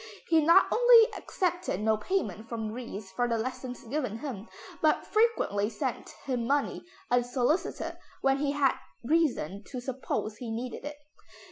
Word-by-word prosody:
He 320 -2 +5
not 335 +5 +7
only 470 -1 +7
accepted 355 - -2
no 220 +1 +2
payment 225 - -2
from 220 -2 -3
Ries 215 -4 -7
for 245 +6 0
the 230 -1 0
lessons 250 +1 -5
given 250 -3 -3
him, 230 -5 -6 0.3
but - - +3
frequently 430 - +2
sent - - -4 0.2
him 245 -4 -1
money 285 +1 0 0.3
unsolicited 245 +6 0 0.2
when 270 0 +2
he 285 0 0
had 280 -2 +3 0.3
reason 240 - +1
to 255 - -6
suppose 245 -4 -3
he 245 - -6
needed 240 +5 -5
it. 295 0 -6
250 Hz, 145 wpm, -29 LUFS, 225-300 Hz, 0.3 s, not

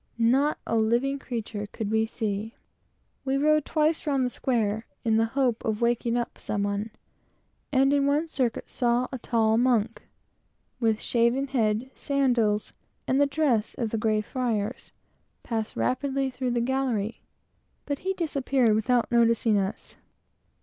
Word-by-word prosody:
Not 260 +6 +3
a - - -1
living 240 +5 +1
creature 225 -5 -5
could 215 -2 -4
we 220 0 +2
see. 220 -1 -3 0.7
We 270 0 0
rode 305 +1 +3
twice 310 +1 0
round 275 -3 +2
the 250 - -2
square, 220 -4 -1 0.2
in 220 -1 +3
the 225 - +3
hope 250 -4 +1
of 215 -1 -1
waking 235 0 +1
up 240 - -4
some 200 -1 -2
one; 205 +2 -2 0.8
and 270 0 +4
in 280 -1 +2
one 290 +3 +2
circuit, 260 -7 -2
saw 245 0 +1
a 260 - -5
tall 225 -1 +2
monk, 235 -3 +1 0.8
with 225 -3 +1
shaven 240 +3 +1
head, 230 0 0
sandals, 240 -7 +1 0.3
and 265 +2 +2
the 285 - +4
dress 275 -7 0
of 230 -3 -2
the 225 - -1
Grey 215 -1 +1
Friars, 230 -1 -3 0.5
pass 225 -2 -3
rapidly 270 +1 0
through 250 -1 -2
a 240 - +1
gallery, 240 -4 -1 0.6
but 285 -1 -3
he 380 +1 -2
disappeared 275 -8 +1
without 235 +3 +1
noticing 230 -2 +3
us. 195 +1 -4
240 Hz, 150 wpm, -26 LUFS, 220-270 Hz, 0.8 s, and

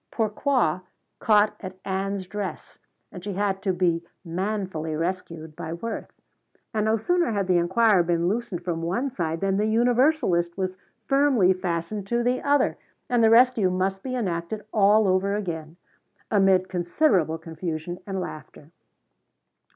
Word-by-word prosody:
Pourquoi 220 - 0 0.4
caught 210 -1 +4
at 185 -1 -8
Ann's 195 0 -2
dress 195 -3 -6 0.3
and 180 - -9
she 205 0 -4
had 195 0 -1
to 195 - 0
be 175 -2 +1 0.2
manfully 185 -3 -3
rescued 165 -2 -4
by 160 +1 -5
Worth. 225 +7 -5 0.6
And 215 -1 0
no 220 +1 +2
sooner 350 - +1
had 200 -2 0
the 180 -1 +3
inquirer 190 +3 +4
been 170 0 0
loosened 200 -4 -2
from 170 -2 -2
one 235 +12 -1
side 165 -7 -3
than 195 0 +1
the 210 +1 +1
universalist 235 - +2
was 185 -1 -2 0.3
firmly 275 -9 +4
fastened 185 +2 -3
to 235 +2 0
the 250 +1 +1
other 285 0 +2 0.3
and 240 -2 +3
the 220 - +6
rescue 230 -4 +5
must 190 +1 -1
be 255 +3 -4
enacted 195 -2 -3
all 210 0 +5
over 190 +2 +1
again, 165 -5 -5 0.5
amid 195 -3 +4
considerable 175 - +1
confusion 165 +1 -5
and 195 -1 -3
laughter. 155 -3 -8
190 Hz, 145 wpm, -25 LUFS, 175-220 Hz, 0.6 s, the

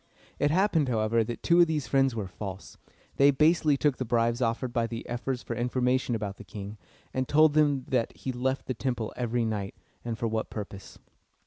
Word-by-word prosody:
It 145 - +3
happened, 165 -4 +2
however, 110 0 +2
that 120 +1 -6
two 175 0 +5
of 170 - +6
these 155 -3 -1
friends 135 -3 +2
were 110 -3 -2
false. 95 +1 -8 0.4
They 140 +1 +6
basely 150 +1 +3
took 145 -2 +1
the - - -2
bribes 120 0 +1
offered 120 +1 -1
by 115 -2 +1
the 115 0 -6
ephors 120 +1 -3
for - - -4
information 125 0 0
about 105 -2 -4
the - - -10
king, 100 +2 -8 0.3
and 130 -1 -1
told 155 0 +5
them 145 -4 +2
that 125 -3 -1
he 130 - -4
left 130 +2 -2
the 130 - -2
temple 120 -2 -3
every 120 -1 -1
night, 105 -3 -3 0.3
and 115 -2 -3
for 115 - -1
what 110 0 -2
purpose. 100 -2 -8
120 Hz, 200 wpm, -28 LUFS, 110-135 Hz, 0.4 s, of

